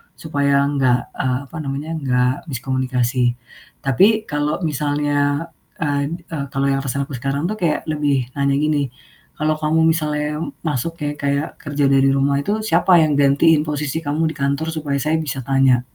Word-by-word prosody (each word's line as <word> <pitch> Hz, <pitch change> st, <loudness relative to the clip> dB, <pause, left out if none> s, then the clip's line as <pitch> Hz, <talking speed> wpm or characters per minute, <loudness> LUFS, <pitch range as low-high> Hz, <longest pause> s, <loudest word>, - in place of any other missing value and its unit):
supaya 140 Hz, -2 st, +1 dB
enggak, 130 Hz, -4 st, +1 dB
eee, 130 Hz, -1 st, 0 dB
apa 165 Hz, -, -9 dB
namanya 140 Hz, +3 st, -4 dB
enggak 125 Hz, -2 st, +1 dB
miskomunikasi. 125 Hz, -1 st, 0 dB, 0.5 s
Tapi, 205 Hz, -, +4 dB
kalau 150 Hz, +3 st, -1 dB
misalnya, 145 Hz, +1 st, 0 dB, 0.3 s
eee 145 Hz, 0 st, -1 dB, 0.2 s
eee, 140 Hz, -3 st, -3 dB
kalau 135 Hz, +1 st, 0 dB
yang, 135 Hz, -, +1 dB
atasan 140 Hz, +1 st, -1 dB
aku 140 Hz, -, -6 dB
sekarang 140 Hz, +4 st, -1 dB
tuh -, -, -2 dB
kayak 165 Hz, -4 st, 0 dB
lebih 145 Hz, -5 st, 0 dB
nanya 140 Hz, 0 st, +2 dB
gini, 150 Hz, -2 st, +1 dB, 0.5 s
"Kalau 155 Hz, 0 st, 0 dB
kamu 155 Hz, +1 st, +1 dB
misalnya 150 Hz, -1 st, 0 dB, 0.2 s
masuk 150 Hz, +2 st, -1 dB
ya, 145 Hz, -, 0 dB
kayak 140 Hz, +1 st, 0 dB
kerja 145 Hz, -1 st, -1 dB
dari 135 Hz, 0 st, +4 dB
rumah 140 Hz, +1 st, +2 dB
itu 210 Hz, +8 st, -1 dB
siapa 180 Hz, -3 st, +4 dB
yang 155 Hz, -2 st, +2 dB
gantiin 145 Hz, +3 st, +4 dB
posisi 150 Hz, 0 st, -2 dB
kamu 155 Hz, +2 st, 0 dB
di -, -, -10 dB
kantor 140 Hz, +3 st, -1 dB
supaya 145 Hz, -3 st, -2 dB
saya 155 Hz, +3 st, +1 dB
bisa 135 Hz, -3 st, -4 dB
tanya?" 135 Hz, -2 st, +3 dB
145 Hz, 160 wpm, -20 LUFS, 135-155 Hz, 0.5 s, Tapi